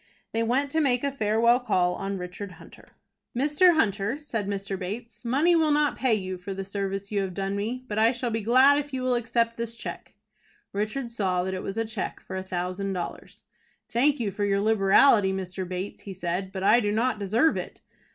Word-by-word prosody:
They 225 Hz, -, 0 dB
went 260 Hz, +5 st, +1 dB
to 320 Hz, -, +2 dB
make 250 Hz, -4 st, +1 dB
a 280 Hz, -, 0 dB
farewell 235 Hz, 0 st, +3 dB
call 185 Hz, -8 st, +1 dB
on 195 Hz, +1 st, -4 dB
Richard 180 Hz, +2 st, -7 dB
Hunter. -, -, -15 dB, 0.5 s
"Mr. 300 Hz, +6 st, +4 dB
Hunter," 210 Hz, 0 st, 0 dB
said 225 Hz, -9 st, -3 dB
Mr. 195 Hz, -1 st, -3 dB
Bates, 210 Hz, +4 st, -6 dB
"money 285 Hz, +9 st, +3 dB
will 320 Hz, -2 st, +3 dB
not 295 Hz, 0 st, +2 dB
pay 255 Hz, -4 st, +2 dB
you 185 Hz, -3 st, -4 dB
for 190 Hz, +2 st, -6 dB
the 195 Hz, 0 st, -4 dB
service 195 Hz, 0 st, -4 dB
you 205 Hz, -1 st, +1 dB
have 190 Hz, -2 st, -4 dB
done 195 Hz, 0 st, -2 dB
me, 235 Hz, +5 st, -3 dB
but 210 Hz, -1 st, -2 dB
I 225 Hz, +1 st, +5 dB
shall 240 Hz, -1 st, -3 dB
be 225 Hz, 0 st, -1 dB
glad 260 Hz, +6 st, +5 dB
if 290 Hz, -1 st, -6 dB
you 255 Hz, -, -3 dB
will 255 Hz, 0 st, +2 dB
accept 230 Hz, -1 st, 0 dB
this 230 Hz, 0 st, -4 dB
cheque." -, -, -8 dB, 0.6 s
Richard 215 Hz, +5 st, -2 dB
saw 185 Hz, -5 st, 0 dB
that 190 Hz, +1 st, -3 dB
it 185 Hz, -, -3 dB
was 195 Hz, -, -5 dB
a 225 Hz, -, 0 dB
cheque 220 Hz, -3 st, -4 dB
for 190 Hz, -, -8 dB
a 190 Hz, -, -2 dB
thousand 185 Hz, +1 st, -3 dB
dollars. 175 Hz, -2 st, -6 dB, 0.5 s
"Thank 275 Hz, +4 st, +2 dB
you 215 Hz, -4 st, -1 dB
for 205 Hz, -, -3 dB
your 200 Hz, -1 st, +2 dB
liberality, 205 Hz, 0 st, +5 dB
Mr. 185 Hz, -1 st, -4 dB
Bates" 185 Hz, +2 st, -5 dB
he 195 Hz, -, -7 dB
said; 185 Hz, +1 st, -3 dB
"but 190 Hz, -1 st, -5 dB
I 235 Hz, -, +6 dB
do 205 Hz, -3 st, 0 dB
not 225 Hz, +1 st, 0 dB
deserve 220 Hz, +10 st, +2 dB
it." -, -, -6 dB
215 Hz, 210 wpm, -26 LUFS, 195-245 Hz, 0.6 s, I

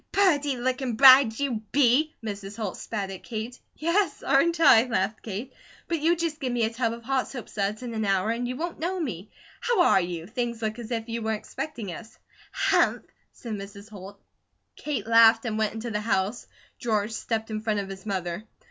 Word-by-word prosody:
"Purty 295 Hz, -9 st, +2 dB
lookin' 255 Hz, 0 st, -1 dB
bride 260 Hz, -2 st, +8 dB
you 260 Hz, -6 st, -1 dB
be!" 285 Hz, +3 st, +3 dB
Mrs. 200 Hz, -1 st, -6 dB
Holt 210 Hz, -5 st, -3 dB
spat 200 Hz, -3 st, -4 dB
at 190 Hz, -, -8 dB
Kate. 230 Hz, +2 st, -6 dB, 0.2 s
"Yes, 335 Hz, +1 st, 0 dB
aren't 330 Hz, +5 st, +3 dB
I?" 240 Hz, -7 st, +7 dB
laughed 215 Hz, -2 st, -1 dB
Kate. 225 Hz, +5 st, -6 dB, 0.3 s
"But 335 Hz, -2 st, -1 dB
you 330 Hz, +3 st, +3 dB
just 330 Hz, -2 st, -3 dB
give 260 Hz, -4 st, -2 dB
me 240 Hz, -1 st, 0 dB
a 225 Hz, +1 st, 0 dB
tub 230 Hz, -1 st, 0 dB
of 235 Hz, 0 st, -8 dB
hot 265 Hz, +1 st, 0 dB
soapsuds 215 Hz, -3 st, -4 dB
and 240 Hz, -2 st, -5 dB
an 220 Hz, -1 st, -2 dB
hour, 195 Hz, +1 st, +1 dB
and 240 Hz, +1 st, -2 dB
you 250 Hz, -, -3 dB
won't 335 Hz, +5 st, -4 dB
know 360 Hz, +4 st, -2 dB
me. 210 Hz, -, -4 dB, 0.3 s
How 480 Hz, -4 st, 0 dB
are 195 Hz, -, +5 dB
you? 175 Hz, -2 st, -4 dB
Things 235 Hz, +3 st, -3 dB
look 220 Hz, +2 st, -2 dB
as 235 Hz, -1 st, -7 dB
if 225 Hz, -2 st, -3 dB
you 230 Hz, 0 st, -3 dB
were 220 Hz, 0 st, -1 dB
expecting 220 Hz, -, -5 dB
us." 220 Hz, +6 st, -10 dB, 0.3 s
"Hump!" -, -, +1 dB, 0.2 s
said 230 Hz, -3 st, -8 dB
Mrs. 200 Hz, +1 st, -8 dB
Holt. 200 Hz, 0 st, -10 dB, 0.6 s
Kate 275 Hz, -9 st, -3 dB
laughed 230 Hz, +1 st, +6 dB
and 220 Hz, -2 st, -2 dB
went 215 Hz, 0 st, 0 dB
into 225 Hz, +1 st, -5 dB
the 210 Hz, 0 st, -1 dB
house. 210 Hz, +1 st, -1 dB, 0.3 s
George 215 Hz, -3 st, 0 dB
stepped 220 Hz, 0 st, -3 dB
in 215 Hz, 0 st, -3 dB
front 215 Hz, -2 st, 0 dB
of 195 Hz, -1 st, -5 dB
his 190 Hz, 0 st, -8 dB
mother. 190 Hz, -1 st, -3 dB
230 Hz, 200 wpm, -26 LUFS, 210-260 Hz, 0.6 s, bride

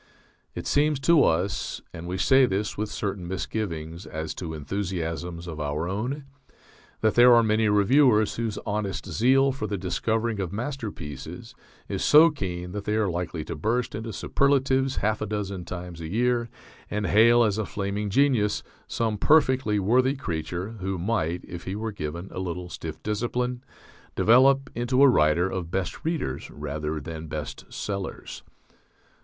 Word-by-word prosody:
It -, -, -5 dB
seems 145 Hz, -1 st, +2 dB
to 165 Hz, 0 st, +5 dB
us 90 Hz, +5 st, 0 dB
(and 85 Hz, +1 st, -7 dB
we 90 Hz, +1 st, -3 dB
say 130 Hz, +4 st, +5 dB
this 100 Hz, 0 st, -2 dB
with 105 Hz, +1 st, -3 dB
certain 100 Hz, -4 st, -4 dB
misgivings 85 Hz, -3 st, -4 dB
as 80 Hz, 0 st, -4 dB
to 80 Hz, -3 st, -6 dB
enthusiasms 85 Hz, 0 st, -4 dB
of 80 Hz, -3 st, -7 dB
our 75 Hz, +3 st, -2 dB
own) 125 Hz, +10 st, -3 dB, 0.8 s
that 110 Hz, -1 st, +3 dB
there 120 Hz, 0 st, +7 dB
are 115 Hz, -, +5 dB
many 110 Hz, 0 st, +2 dB
reviewers 110 Hz, +1 st, +4 dB
whose 115 Hz, -3 st, -2 dB
honest 105 Hz, -2 st, -3 dB
zeal 135 Hz, +4 st, +3 dB
for 130 Hz, -5 st, -4 dB
the 100 Hz, -1 st, -2 dB
discovering 110 Hz, +4 st, -1 dB
of 90 Hz, -4 st, -2 dB
masterpieces 105 Hz, -, -6 dB, 0.3 s
is -, -, -3 dB
so 155 Hz, +2 st, +7 dB
keen 90 Hz, -9 st, -5 dB
that 100 Hz, +1 st, -5 dB
they 105 Hz, -, 0 dB
are 105 Hz, -4 st, +1 dB
likely 85 Hz, -2 st, -3 dB
to -, -, -5 dB
burst 115 Hz, +10 st, -1 dB
into 110 Hz, +1 st, -5 dB
superlatives 135 Hz, +4 st, +1 dB
half 110 Hz, +1 st, 0 dB
a 110 Hz, -, -2 dB
dozen 100 Hz, -3 st, -4 dB
times 90 Hz, -2 st, -7 dB
a 80 Hz, -, -5 dB
year 120 Hz, +4 st, +1 dB, 0.4 s
and 105 Hz, 0 st, -2 dB
hail 115 Hz, +5 st, +5 dB
as 105 Hz, -1 st, +1 dB
a 110 Hz, -, -1 dB
flaming 100 Hz, +1 st, -3 dB
genius 115 Hz, -3 st, +2 dB, 0.2 s
some 110 Hz, -3 st, -1 dB
perfectly 130 Hz, -6 st, +3 dB
worthy 125 Hz, +7 st, +3 dB
creature, 85 Hz, -, -4 dB
who 95 Hz, 0 st, -2 dB
might, 90 Hz, -3 st, -1 dB
if 85 Hz, -1 st, -8 dB
he 95 Hz, -, -3 dB
were 110 Hz, +1 st, -3 dB
given 85 Hz, -1 st, -5 dB
a -, -, -5 dB
little 90 Hz, -1 st, -4 dB
stiff 80 Hz, -2 st, -7 dB
discipline, 120 Hz, +4 st, -2 dB, 0.5 s
develop 135 Hz, +4 st, +5 dB
into 125 Hz, +3 st, +2 dB
a -, -, +9 dB
writer 85 Hz, -, +4 dB
of 95 Hz, -3 st, -4 dB
best 95 Hz, 0 st, -3 dB
readers 160 Hz, -, -2 dB
rather 75 Hz, +1 st, -4 dB
than 80 Hz, +2 st, -7 dB
best 75 Hz, -1 st, -6 dB
sellers. 100 Hz, -2 st, -5 dB
105 Hz, 160 wpm, -26 LUFS, 85-120 Hz, 0.8 s, a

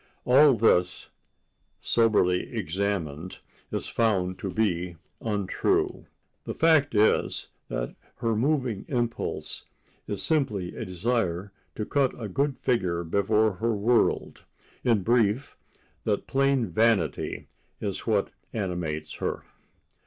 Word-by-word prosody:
All 135 Hz, +2 st, +7 dB
this, 90 Hz, -5 st, +2 dB, 0.7 s
soberly 105 Hz, -4 st, +2 dB
examined, 90 Hz, -4 st, -2 dB, 0.3 s
is -, -, -2 dB
found 95 Hz, -5 st, +1 dB
to 95 Hz, -, -3 dB
be 90 Hz, -4 st, 0 dB, 0.3 s
untrue. 105 Hz, -4 st, 0 dB, 0.4 s
The -, -, -4 dB
fact 155 Hz, -6 st, +4 dB
is 105 Hz, +1 st, +2 dB, 0.2 s
that -, -, -3 dB, 0.2 s
her 115 Hz, -2 st, 0 dB
moving 125 Hz, -3 st, 0 dB
impulse 120 Hz, -3 st, -2 dB, 0.4 s
is 100 Hz, -2 st, -1 dB
simply 110 Hz, -, 0 dB
a -, -, -4 dB
desire 95 Hz, -1 st, -1 dB, 0.2 s
to 105 Hz, -, -3 dB
cut 135 Hz, -1 st, +1 dB
a 110 Hz, -, -4 dB
good 140 Hz, +7 st, 0 dB
figure 90 Hz, -9 st, 0 dB
before 105 Hz, +5 st, +2 dB
her 115 Hz, 0 st, 0 dB
world—in 115 Hz, 0 st, 0 dB
brief, 120 Hz, +4 st, +2 dB, 0.5 s
that 105 Hz, -2 st, 0 dB
plain 135 Hz, -1 st, +2 dB
vanity 110 Hz, -9 st, +1 dB, 0.3 s
is 100 Hz, +1 st, -4 dB
what 105 Hz, -3 st, +1 dB, 0.2 s
animates 85 Hz, -7 st, -3 dB
her. -, -, -3 dB
105 Hz, 110 wpm, -27 LUFS, 90-120 Hz, 0.7 s, All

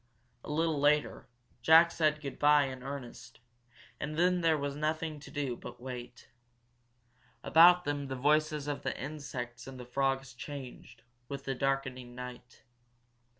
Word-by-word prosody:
A -, -, -9 dB
little 160 Hz, 0 st, 0 dB
later 150 Hz, +1 st, +2 dB, 0.3 s
Jack 165 Hz, +3 st, +7 dB
said 155 Hz, -2 st, +1 dB
good 140 Hz, -2 st, -6 dB
bye 150 Hz, 0 st, +6 dB
in 130 Hz, -1 st, -6 dB
earnest, 125 Hz, -3 st, -8 dB, 0.6 s
and 150 Hz, +1 st, -4 dB
then 180 Hz, +1 st, +3 dB
there 165 Hz, -2 st, +3 dB
was 140 Hz, -1 st, -3 dB
nothing 155 Hz, +1 st, -2 dB
to 140 Hz, -, -12 dB
do 140 Hz, -4 st, -2 dB
but -, -, -10 dB
wait. 125 Hz, -1 st, -8 dB, 1.2 s
About 175 Hz, +2 st, +7 dB
them 145 Hz, -1 st, -2 dB
the 135 Hz, -, -4 dB
voices 150 Hz, +2 st, +1 dB
of 145 Hz, -1 st, -3 dB
the -, -, -3 dB
insects 130 Hz, -4 st, -6 dB
and 130 Hz, -1 st, -9 dB
frogs 135 Hz, +1 st, -1 dB
changed, 125 Hz, -3 st, -9 dB, 0.3 s
with 140 Hz, -1 st, -5 dB
the 135 Hz, -, -1 dB
darkening 130 Hz, -2 st, -2 dB
night. 125 Hz, 0 st, -10 dB
140 Hz, 145 wpm, -31 LUFS, 130-150 Hz, 1.2 s, Jack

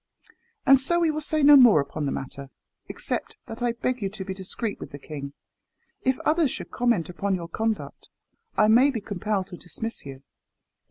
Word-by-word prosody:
And 270 Hz, -1 st, +6 dB
so 345 Hz, +6 st, +1 dB
we 330 Hz, -2 st, +3 dB
will 310 Hz, 0 st, -3 dB
say 310 Hz, 0 st, 0 dB
no 290 Hz, +1 st, +9 dB
more 245 Hz, -, +8 dB
upon 140 Hz, +1 st, -3 dB
the -, -, -1 dB
matter, 135 Hz, +1 st, -6 dB, 0.4 s
except 450 Hz, 0 st, -3 dB
that 225 Hz, +2 st, -9 dB
I 240 Hz, -1 st, +1 dB
beg 250 Hz, +1 st, -2 dB
you 195 Hz, -, -1 dB
to 195 Hz, -1 st, -7 dB
be 190 Hz, -, -4 dB
discreet 195 Hz, +3 st, -5 dB
with -, -, -8 dB
the 145 Hz, -, -9 dB
king. 140 Hz, -1 st, -8 dB, 0.7 s
If 260 Hz, 0 st, +1 dB
others 315 Hz, -2 st, +2 dB
should -, -, -7 dB
comment 235 Hz, -9 st, +1 dB
upon 190 Hz, +2 st, -1 dB
your 170 Hz, -2 st, -5 dB
conduct, 220 Hz, +5 st, -3 dB, 0.5 s
I 215 Hz, -, +5 dB
may 245 Hz, +6 st, +6 dB
be 250 Hz, -5 st, -2 dB
compelled 205 Hz, -1 st, -2 dB
to 180 Hz, -, -9 dB
dismiss 225 Hz, +7 st, -6 dB
you." 135 Hz, -1 st, -10 dB
215 Hz, 195 wpm, -25 LUFS, 175-260 Hz, 0.7 s, no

